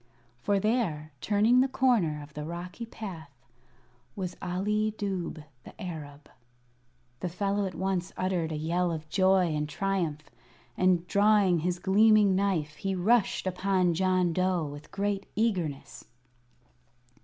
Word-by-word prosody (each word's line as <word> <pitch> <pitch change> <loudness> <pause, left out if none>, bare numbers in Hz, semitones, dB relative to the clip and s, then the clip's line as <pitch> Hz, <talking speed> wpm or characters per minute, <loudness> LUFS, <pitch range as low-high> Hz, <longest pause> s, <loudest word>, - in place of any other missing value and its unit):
For 200 +6 +1
there, 190 -9 -1
turning 220 +5 +4
the 265 - +3
corner 210 - +1
of 150 +1 -14
the 150 - -5
rocky 180 +7 -6
path, 185 -10 -8 0.9
was 185 -2 -4
Ali 210 +4 -1
Dubh 185 -6 -3 0.2
the - - -14
Arab. 150 -6 -7 0.9
The 180 - -3
fellow 200 +3 -1
at 185 - -7
once 190 0 -2
uttered 180 -3 -1
a - - -2
yell 170 +3 0
of 160 -1 -5
joy 185 -2 +3
and 150 0 -2
triumph, 170 -3 -2 0.5
and 180 -2 +2
drawing 200 -3 +4
his 175 +2 -1
gleaming 205 +1 +4
knife 180 -7 0
he 195 -1 -2
rushed 210 +4 +2
upon 185 -1 +1
John 185 0 +1
Dough 185 -2 +1
with 145 +1 -9
great 200 0 -2
eagerness. 180 -11 -2
185 Hz, 130 wpm, -28 LUFS, 165-200 Hz, 0.9 s, turning